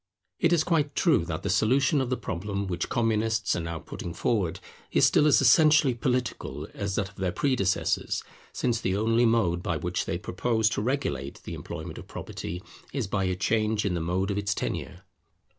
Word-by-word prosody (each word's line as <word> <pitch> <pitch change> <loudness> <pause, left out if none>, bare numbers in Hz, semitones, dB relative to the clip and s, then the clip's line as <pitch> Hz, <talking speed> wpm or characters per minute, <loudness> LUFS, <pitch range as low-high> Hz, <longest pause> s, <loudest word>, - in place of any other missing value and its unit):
It 170 - +3
is 170 -3 +4
quite 155 -4 +1
true 155 - +3
that 80 -2 -4
the 100 - -1
solution 135 +8 +3
of 130 - -2
the 130 - 0
problem 100 +3 -3
which 90 -2 -3
Communists 110 -2 +1
are - - -1
now 85 0 -4
putting 85 +2 -7
forward, 95 -5 0 0.3
is - - +5
still 150 - +4
as 150 - +5
essentially 155 -4 +6
political 125 0 -2
as 100 -1 -3
that 100 -2 -1
of - - -22
their 95 -2 -1
predecessors; 100 -5 0 0.3
since 120 -2 -1
the 95 -2 0
only 115 +3 +3
mode 95 -7 +2
by 85 -3 -1
which 90 +2 -2
they 85 - -2
propose 110 +5 0
to - - -2
regulate 85 - -2
the - - -6
employment - - -7
of - - -11
property, 90 +2 -6 0.3
is 135 -5 -2
by 95 0 -1
a 95 0 0
change 110 +2 +1
in 100 - +1
the 85 - -1
mode 95 +4 0
of 100 - -1
its 100 -1 -1
tenure. 90 - -4
105 Hz, 195 wpm, -27 LUFS, 90-125 Hz, 0.3 s, essentially